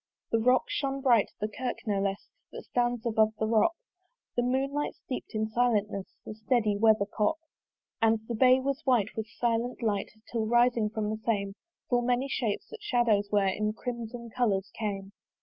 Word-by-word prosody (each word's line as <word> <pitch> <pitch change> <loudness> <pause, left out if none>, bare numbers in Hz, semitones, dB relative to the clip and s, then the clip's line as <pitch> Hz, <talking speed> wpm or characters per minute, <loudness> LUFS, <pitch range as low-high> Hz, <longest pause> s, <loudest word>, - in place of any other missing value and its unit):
The 225 - +3
rock 250 +3 +4
shone 275 -1 -2
bright, 240 -6 +4
the 210 - -1
kirk 245 +3 -4
no 205 -3 0
less 195 0 -2 0.2
That - - -8
stands 240 -1 -1
above 220 -1 +3
the 220 - 0
rock: 225 +9 +3 0.6
The 245 - +2
moonlight 270 +4 -1
steep'd 255 -3 -7
in 215 0 +1
silentness 215 -4 +1 0.2
The - - -6
steady 215 -1 +1
weathercock. 210 +4 +2 0.6
And 225 0 +4
the 235 - -3
bay 255 +3 +5
was 275 +2 -2
white 240 -6 +2
with 220 0 -3
silent 235 +2 -1
light, 205 -3 0 0.2
Till 225 -2 -1
rising 240 -2 +3
from 215 -1 -2
the 215 0 -5
same 200 -3 0 0.3
Full 245 -1 +2
many 250 +2 +1
shapes, 235 -6 -2
that 450 - -9
shadows 235 - +2
were, 205 -1 +3
In 210 +2 -1
crimson 235 0 -6
colours 205 -6 0
came. 200 -3 -4
225 Hz, 170 wpm, -29 LUFS, 210-245 Hz, 0.6 s, bay